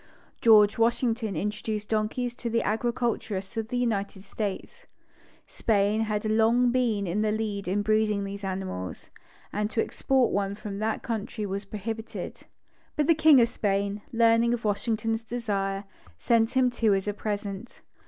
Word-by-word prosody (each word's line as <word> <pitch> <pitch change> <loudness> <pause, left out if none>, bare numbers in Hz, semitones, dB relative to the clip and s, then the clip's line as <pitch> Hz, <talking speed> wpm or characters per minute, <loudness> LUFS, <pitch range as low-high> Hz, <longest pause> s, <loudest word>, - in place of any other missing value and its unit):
George 215 -1 +6
Washington 230 -2 +1
introduced 210 +3 -3
donkeys 230 +3 -1
to 240 - -4
the 230 0 +1
agriculturists 225 -3 -2
of 225 -1 -2
the 245 - -2
United 200 -5 -1
States. 215 - -5 0.6
Spain 210 0 +1
had 215 -1 -1
long 225 +3 +3
been 235 -5 +1
in 185 +4 -1
the 215 0 +1
lead 210 -3 -3
in 200 +3 0
breeding 215 -1 +2
these 200 0 -6
animals; 185 - -5 0.4
and 210 0 -1
to 225 - -3
export 260 +2 +1
one 200 0 -1
from 205 -1 -6
that 220 +1 -1
country 220 -1 -3
was 200 +1 -4
prohibited. 220 +3 -6 0.5
But 300 - +1
the 330 - +5
King 315 -3 +6
of 230 - +3
Spain, 200 -1 -1
learning 230 0 +4
of 240 - -9
Washington^ 225 +2 -1
desire, 200 -5 -2 0.3
sent 230 - +2
him 255 -1 +4
two 225 -4 +2
as 195 +1 -2
a 205 - 0
present. 205 +1 -5
215 Hz, 155 wpm, -27 LUFS, 200-230 Hz, 0.6 s, George